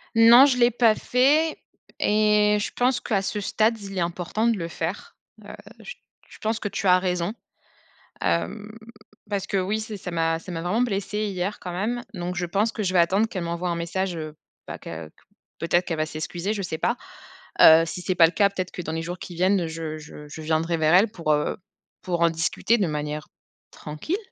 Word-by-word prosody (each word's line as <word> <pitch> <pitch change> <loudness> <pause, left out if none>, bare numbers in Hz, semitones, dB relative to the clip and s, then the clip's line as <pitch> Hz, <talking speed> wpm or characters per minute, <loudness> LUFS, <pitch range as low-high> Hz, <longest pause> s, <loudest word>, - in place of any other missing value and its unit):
Non, 235 +4 +9
je 260 -3 +2
l'ai 240 0 +5
pas 230 -2 +4
fait 290 +8 +2 0.4
et 210 0 +3
je - - -3
pense 250 +1 +2
qu'à 200 -4 0
ce 210 - -2
stade, 220 +3 +1
il 195 -1 -8
est - - +1
important 175 +6 -1
de 230 -3 +2
le 165 -1 -4
faire. 170 +3 -5 0.3
Heu, - - -10 0.3
j - - -9 0.3
je - - -14
pense 220 +1 -1
que 210 - -3
tu 200 - -3
as 180 0 +7
raison, 180 +1 -1 0.9
hem, 85 - -1 0.6
parce 200 -2 -2
qu'oui, 200 +3 -1
c'est 215 -1 -6
ça 180 - -7
m'a 165 -1 0
ça 180 - -13
m'a 165 - -4
vraiment 210 +8 0
blessé 210 -1 -1
hier 195 +1 -3
quand 180 - -6
même. 235 +6 -2
Donc 180 -2 -4
je 175 - -1
pense 205 +6 0
que 215 - -3
je 185 0 -1
vais 180 - +4
attendre 195 +6 +3
qu'elle 185 -5 -5
m'envoie 170 +1 -3
un 170 - -1
message, 175 +2 -2
heu, 155 -1 -6 0.3
bah - - -6
qu'à 80 -1 -8
q - - -34 0.4
peut-être 175 +1 +1
qu'elle 165 -3 -3
va 155 - 0
s'excuser, 170 +6 -4
je 205 - -3
sais 165 -3 -4
pas, 235 +9 0 0.7
heu, 160 +1 +9
si 180 - -6
c'est 185 +1 -1
pas 170 - +7
le 165 - -4
cas, 200 +1 +4
peut-être 185 -2 -4
que 180 - -6
dans 160 -1 -5
les 160 - -2
jours 175 +2 -6
qui 175 - -8
viennent, 185 -1 +2
je 160 -1 -5
je 150 -1 -11
je 160 - -8
viendrai 160 +2 0
vers 160 +1 +2
elle 205 +4 +5
pour 165 -7 0
heu, 150 - -1 0.4
pour 175 -2 -2
en 170 - +5
discuter 165 +7 +1
de 195 -6 +1
manière 150 0 -4 0.4
tranquille, 155 - -4
180 Hz, 215 wpm, -24 LUFS, 165-210 Hz, 0.9 s, Non